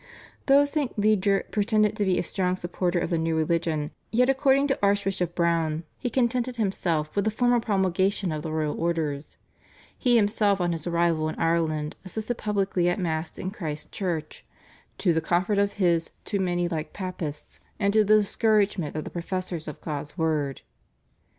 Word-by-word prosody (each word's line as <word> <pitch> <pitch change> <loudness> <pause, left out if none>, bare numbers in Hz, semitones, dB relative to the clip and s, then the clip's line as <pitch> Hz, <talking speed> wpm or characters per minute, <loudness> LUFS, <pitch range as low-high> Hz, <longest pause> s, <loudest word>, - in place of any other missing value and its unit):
" - - -27
Though 280 +1 +6
St. 285 -4 -2
Leger 205 -2 +3
pretended 215 0 +2
to 210 -2 0
be 185 -1 +2
a - - +1
strong 180 +1 -1
supporter 175 0 -2
of 175 - -1
the 170 - +1
new 165 0 0
religion, 160 -1 0 0.2
yet, 250 +3 +3
according 270 0 +3
to 270 - 0
Archbishop 195 -3 +1
Browne, 165 -2 +1 0.2
he 245 - -2
contented 250 0 0
himself 175 -8 -1
with 200 - +2
the 220 - +2
formal 245 +2 +2
promulgation 190 -3 +1
of 155 -1 -3
the 160 - -5
royal 155 -1 -2
orders. 160 -4 -2 0.6
He 245 -2 +2
himself 205 -2 +3
on 175 -1 +1
his 165 0 -4
arrival 170 -2 +1
in - - -5
Ireland 160 -2 0
assisted 220 +5 -4
publicly 195 -4 +1
at 175 - 0
Mass 160 -3 -2
in 185 - -4
Christ's 155 -7 -6
Church, 175 -6 -3 0.5
"to 175 -4 +2
the 160 - +1
comfort 180 +5 +1
of 200 0 +1
his 170 -4 +1 0.2
too 200 - -1
many 175 -2 0
like 160 -3 -4
Papists, 180 -6 -6 0.2
and 200 -1 +2
to 215 0 +5
the 215 +1 +5
discouragement 205 - +1
of 155 - -2
the - - -8
professors 175 -1 -4
of 150 - -7
God's 145 +1 -5
word." 150 -5 0
180 Hz, 175 wpm, -26 LUFS, 165-210 Hz, 0.6 s, Though